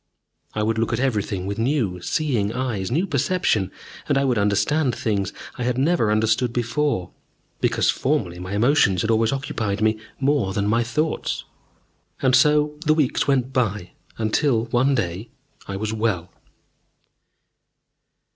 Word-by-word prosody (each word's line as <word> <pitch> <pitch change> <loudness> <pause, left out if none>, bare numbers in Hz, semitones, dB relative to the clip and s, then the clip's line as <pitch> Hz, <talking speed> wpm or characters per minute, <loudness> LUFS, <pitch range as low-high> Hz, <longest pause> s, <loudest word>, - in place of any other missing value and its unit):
I 105 - 0
would 110 +1 0
look 115 - 0
at 115 - 0
everything 105 -7 -1
with 100 +2 -4
new, 115 - 0
seeing 120 - 0
eyes, 120 -7 -2
new 165 +10 +1
perception, 140 - +1 0.4
and 145 - +3
I 140 - +2
would 125 -5 +1
understand 120 +7 +1
things 100 -4 -1 0.3
I - - -1
had 125 0 0
never 140 -5 +2
understood 110 +3 +2
before, 120 - -1 0.5
because - - +2
formerly 110 - -1
my 90 +2 -6
emotions 105 - +3
had 110 - +1
always 115 0 +2
occupied 115 -7 -2
me 110 0 +1 0.2
more 135 -8 +1
than 100 0 0
my 115 +3 +2
thoughts. 150 +7 -2 0.8
And 130 -1 +3
so 150 +2 +3
the 155 -2 +3
weeks 145 -3 +1
went 135 -2 +1
by, 105 -8 -1 0.3
until, 115 +2 +1
one 125 +4 +2
day, 95 0 -3 0.4
I 95 - -4
was 110 +2 -3
well. 105 -6 -1
115 Hz, 145 wpm, -23 LUFS, 105-135 Hz, 0.8 s, and